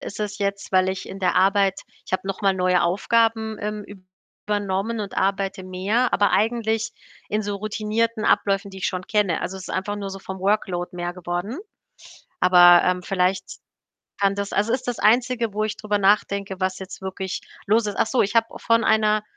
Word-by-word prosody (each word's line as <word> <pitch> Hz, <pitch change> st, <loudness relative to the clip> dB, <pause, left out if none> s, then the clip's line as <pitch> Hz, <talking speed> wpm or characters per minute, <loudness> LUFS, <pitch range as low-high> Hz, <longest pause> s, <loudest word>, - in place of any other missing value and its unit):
ist 210 Hz, -, -7 dB
es 210 Hz, 0 st, -3 dB
jetzt, 200 Hz, -1 st, -2 dB
weil 185 Hz, 0 st, +3 dB
ich 190 Hz, 0 st, -4 dB
in 195 Hz, -, -7 dB
der 185 Hz, -2 st, +1 dB
Arbeit 195 Hz, 0 st, +3 dB, 0.3 s
ich -, -, -12 dB
habe 185 Hz, -, -1 dB
noch 195 Hz, -1 st, -4 dB
mal 195 Hz, -2 st, +3 dB
neue 180 Hz, -1 st, +2 dB
Aufgaben, 220 Hz, +4 st, +1 dB
ähm, 210 Hz, 0 st, -4 dB, 0.6 s
übernommen 205 Hz, +2 st, -1 dB
und 200 Hz, -2 st, -6 dB
arbeite 195 Hz, -1 st, -1 dB
mehr, 195 Hz, +7 st, 0 dB
aber 205 Hz, -, +3 dB
eigentlich 225 Hz, 0 st, 0 dB, 0.4 s
in 215 Hz, +1 st, -1 dB
so 205 Hz, -1 st, -3 dB
routinierten 215 Hz, +2 st, -1 dB
Abläufen, 195 Hz, 0 st, +1 dB
die 190 Hz, -, -10 dB
ich 180 Hz, -, -1 dB
schon 185 Hz, -1 st, -4 dB
kenne. 205 Hz, -6 st, +1 dB
Also, 190 Hz, -, -4 dB
es 190 Hz, -, -9 dB
ist -, -, -5 dB
einfach 205 Hz, +2 st, -2 dB
nur 200 Hz, -1 st, -5 dB
so 195 Hz, 0 st, -8 dB
vom 190 Hz, 0 st, -7 dB
Workload 185 Hz, -3 st, -1 dB
mehr 175 Hz, 0 st, -3 dB
geworden. 180 Hz, -, -4 dB, 0.8 s
Aber, 175 Hz, -1 st, +7 dB
ähm, 180 Hz, 0 st, +1 dB
vielleicht 185 Hz, +1 st, 0 dB, 0.7 s
kann 200 Hz, -1 st, +3 dB
das 200 Hz, 0 st, -4 dB
also, 210 Hz, +3 st, +1 dB
ist 255 Hz, 0 st, -2 dB
das 245 Hz, -, -2 dB
Einzige, 235 Hz, 0 st, +2 dB
wo 215 Hz, +1 st, -1 dB
ich 215 Hz, -, -3 dB
drüber 210 Hz, -1 st, -1 dB
nachdenke, 200 Hz, -1 st, +1 dB
was 185 Hz, 0 st, -1 dB
jetzt 190 Hz, 0 st, -9 dB
wirklich 190 Hz, 0 st, -4 dB, 0.2 s
los 220 Hz, +2 st, +3 dB
ist. 205 Hz, -1 st, -4 dB
Ach -, -, +2 dB
so, 255 Hz, -, +2 dB
ich 200 Hz, -, -1 dB
habe 230 Hz, -1 st, +3 dB
von 230 Hz, 0 st, +2 dB
einer 215 Hz, -1 st, +3 dB
200 Hz, 195 wpm, -23 LUFS, 190-215 Hz, 0.8 s, Aber